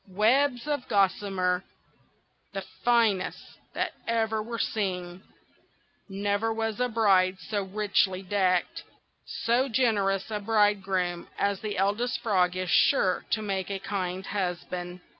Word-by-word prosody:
webs 245 +7 +2
of 290 -3 0
gossamer, 195 -2 +1 0.9
the 195 -1 -4 0.2
finest 230 -5 +2 0.4
that - - -1 0.2
ever 220 -1 0
were 230 +2 -5
seen! 180 -4 -2 0.9
Never 200 +3 -1
was 225 0 -2
bride 195 -4 +3
so 205 +2 -3
richly 195 -1 0
decked. 185 -2 +1 0.6
So 245 +4 +2
generous 205 -5 +1
a 210 - -1
bridegroom 195 -4 +1
as 200 -1 0
the 210 -2 -4
Eldest 210 +6 0
Frog 185 -5 +2
is 185 -2 -2
sure 185 -10 +3
to 215 - 0
make 195 -2 -2
a 200 - -2
kind 190 -1 -3
husband." 180 -2 -4
200 Hz, 120 wpm, -27 LUFS, 185-220 Hz, 0.9 s, bride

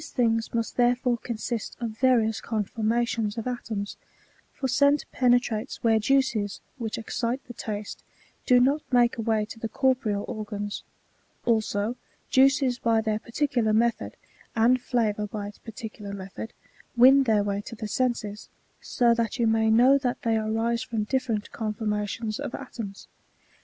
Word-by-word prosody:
79 235 -2 +1
things 225 0 -3
must 230 -1 -2
therefore 245 0 +2
consist 235 -1 -4
of 235 -2 -3
various 225 -2 +2
conformations 225 0 -1
of 225 - -3
atoms; 225 -5 -4 0.5
for 270 - -3
scent 280 +3 +3
penetrates 245 -2 +1
where 225 -1 +4
juices 225 -4 +1 0.2
which 225 -2 -3
excite 235 +2 -2
the 245 - -9
taste 210 -2 -6 0.4
do 250 -1 +6
not 275 +5 +3
make 240 -1 +3
a - - +1
way 220 -1 +1
to 225 - -10
the 225 - -3
corporeal 245 -7 +1
organs; 205 -1 -4 0.6
also 220 -1 +1 0.4
juices 265 -2 +4
bj 225 -1 +2
their 215 -1 0
particular 235 -2 0
method, 230 +1 +1 0.4
and 240 +3 +4
flavour 215 -4 0
bj 205 -1 -5
its 205 - -14
particular 215 -2 -8
method, 195 +3 -7 0.5
win 265 +3 +8
their 215 -3 +3
way 200 0 -1
to 230 - -9
the 215 0 -5
senses; 215 -3 -2 0.3
so 240 -1 +2
that 230 0 -1
you 235 - +2
may 220 0 +3
know 250 +5 +6
that 255 0 -2
they 230 -2 +2
arise 225 +2 0
from 230 -4 -2
different 230 -3 -2
conformations 215 0 -3
of - - -4
atoms. 225 -7 -8
230 Hz, 150 wpm, -26 LUFS, 215-245 Hz, 0.6 s, win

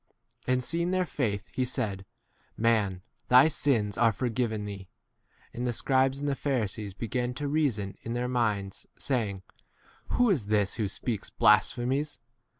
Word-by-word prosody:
20 - - 0
And 125 0 +1
seeing 170 +5 0
their 185 0 +1
faith, 110 - -2
he 130 - 0
said, 115 -6 -2 0.6
v - - -8
Man, 105 -6 +2 0.2
thy 125 +4 +7
sins 120 - +1
are 115 -1 +5
forgiven 115 -2 -2
thee. 100 -2 -7 0.6
21 - - -9
And 125 - -1
the 120 - 0
scribes 135 +2 +1
and 145 - -3
the 140 - +1
Pharisees 110 -8 -2
began 125 +3 -2
to 145 +1 -3
reason 135 -10 0
[in 115 - -5
their 120 +1 -1
minds], 105 -6 -1
saying, 105 -8 -2 0.6
Who 245 -3 +3
is 130 - 0
this 105 -2 +2
who 110 -3 -1
speaks 105 +1 -3
blasphemies 130 +7 +2
120 Hz, 160 wpm, -28 LUFS, 105-135 Hz, 0.6 s, thy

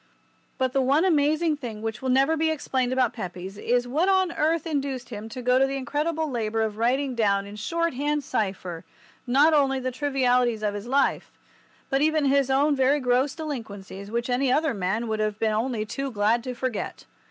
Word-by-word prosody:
But 260 -1 0
the 270 - +2
one 280 +7 +3
amazing 310 -1 +2
thing 225 -6 -7
which 225 -1 -4
will 260 - -2
never 270 +5 +3
be 320 0 +1
explained 260 -5 -1
about 255 -2 +1
Pepys 185 -3 -6
is 245 +4 0
what 315 +9 +1
on 375 -2 +3
earth 325 -1 0
induced 275 -5 -3
him 220 -1 -7
to 250 +3 -7
go 250 +1 +3
to 270 - +4
the 275 - -3
incredible 310 +4 -1
labour 225 -4 -1
of 215 -1 -3
writing 260 +3 +1
down 200 -4 +1
in 200 +1 -9
shorthand 295 +3 -1
cipher 190 -7 -3 0.4
not 285 +6 +5
only 275 -3 +3
all 260 - -5
the 255 - -1
trivialities 250 -4 +1
of 210 -1 0
his 205 +2 -6
life, 275 +2 +1 0.6
but 270 +1 +2
even 310 -1 +2
his 275 -1 +3
own 285 +2 +3
very 270 +2 +3
gross 255 +1 +1
delinquencies 205 -10 -7
which 235 +2 -2
any 255 +1 +1
other 300 +1 +2
man 205 +4 -1
would 220 -1 -2
have 215 -1 -1
been 220 -1 0
only 220 0 -1
too 275 +5 -4
glad 225 +1 +1
to 250 -1 -4
forget. 250 -2 -4
255 Hz, 200 wpm, -25 LUFS, 225-285 Hz, 0.6 s, not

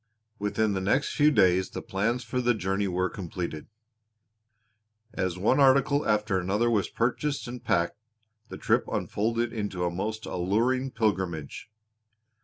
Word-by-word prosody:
Within 105 +1 0
the 95 - -2
next 105 +9 +1
few 150 0 +4
days 95 -9 +3
the - - -6
plans 115 +6 -1
for 125 +2 -2
the 120 -1 +2
journey 95 0 -1
were 90 0 0
completed. 85 -4 -6 1.5
As 90 -1 -2
one 110 +9 +2
article 140 +1 +4
after 105 -3 +1
another 105 +6 +1
was 105 -4 +1
purchased 130 +4 -1
and 120 0 -7
packed 85 +4 0 0.5
the - - -7
trip - - +1
unfolded 115 +2 -1
into 100 -5 -2
a 85 - 0
most 110 +5 -4
alluring 115 +9 0
pilgrimage. 95 - -2
105 Hz, 140 wpm, -27 LUFS, 95-120 Hz, 1.5 s, few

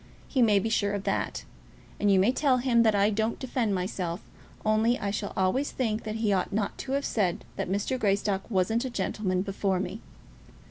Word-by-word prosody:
He 260 - +1
may 215 -4 +5
be 200 - +1
sure 205 -2 +1
of 200 -1 -3
that. - - -2 0.5
And 205 - +2
you 195 - +5
may 200 +6 +4
tell 265 -1 +2
him 245 -2 +3
that 220 -2 +4
I 200 +1 +3
don't 220 +2 0
defend 240 -5 -1
myself, 180 -1 -3 0.4
only 220 +3 +3
I 200 - -2
shall 205 0 -3
always 195 +10 +1
think 225 -4 -2
that 215 0 -3
he 220 -2 +1
ought 185 - 0
not 205 0 -1
to 265 - -4
have 280 0 0
said 185 -6 0
that - - -3
Mr. 205 +7 -1
Greystock 200 -1 0
wasn't 220 +3 +1
a 260 - -3
gentleman 185 -6 -1
before 195 -1 -1
me." 190 +3 -4
210 Hz, 200 wpm, -28 LUFS, 195-230 Hz, 0.5 s, may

